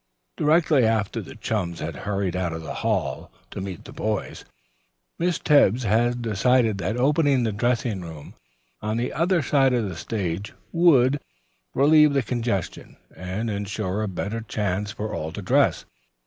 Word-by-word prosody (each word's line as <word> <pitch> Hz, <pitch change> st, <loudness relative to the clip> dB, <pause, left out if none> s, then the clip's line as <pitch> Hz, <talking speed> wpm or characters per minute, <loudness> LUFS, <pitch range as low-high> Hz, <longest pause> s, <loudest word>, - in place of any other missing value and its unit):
Directly 155 Hz, -3 st, +3 dB
after 110 Hz, 0 st, +1 dB
the 95 Hz, -, -11 dB
chums 100 Hz, -6 st, -3 dB
had 80 Hz, 0 st, -4 dB
hurried 100 Hz, -3 st, -2 dB
out 90 Hz, -2 st, -1 dB
of 80 Hz, 0 st, -6 dB
the 80 Hz, -, -5 dB
hall -, -, -1 dB, 0.2 s
to -, -, -5 dB
meet 95 Hz, -3 st, -7 dB
the -, -, -10 dB
boys, 105 Hz, -2 st, -3 dB, 0.8 s
Miss 175 Hz, 0 st, +1 dB
Tebbs 130 Hz, -5 st, +4 dB
had 120 Hz, +3 st, +1 dB
decided 115 Hz, 0 st, +2 dB
that 105 Hz, +6 st, -2 dB
opening 140 Hz, 0 st, +3 dB
the 110 Hz, -, 0 dB
dressing 115 Hz, -1 st, 0 dB
room 80 Hz, -4 st, -9 dB, 0.5 s
on 110 Hz, +1 st, -2 dB
the 120 Hz, +1 st, -2 dB
other 170 Hz, 0 st, +1 dB
side 135 Hz, -1 st, +3 dB
of 120 Hz, -4 st, +1 dB
the 95 Hz, -, -6 dB
stage 100 Hz, 0 st, -4 dB, 0.2 s
would 145 Hz, -6 st, +4 dB, 0.6 s
relieve 150 Hz, +1 st, +5 dB
the 140 Hz, -2 st, +2 dB
congestion 115 Hz, -5 st, -3 dB, 0.2 s
and 95 Hz, +5 st, -4 dB
insure 100 Hz, 0 st, -3 dB
a 110 Hz, -, -1 dB
better 100 Hz, +4 st, -4 dB
chance 105 Hz, -2 st, -2 dB
for 105 Hz, +1 st, -5 dB
all 80 Hz, +1 st, -4 dB
to 105 Hz, -, -6 dB
dress. 90 Hz, -, +2 dB
110 Hz, 160 wpm, -24 LUFS, 95-130 Hz, 0.8 s, relieve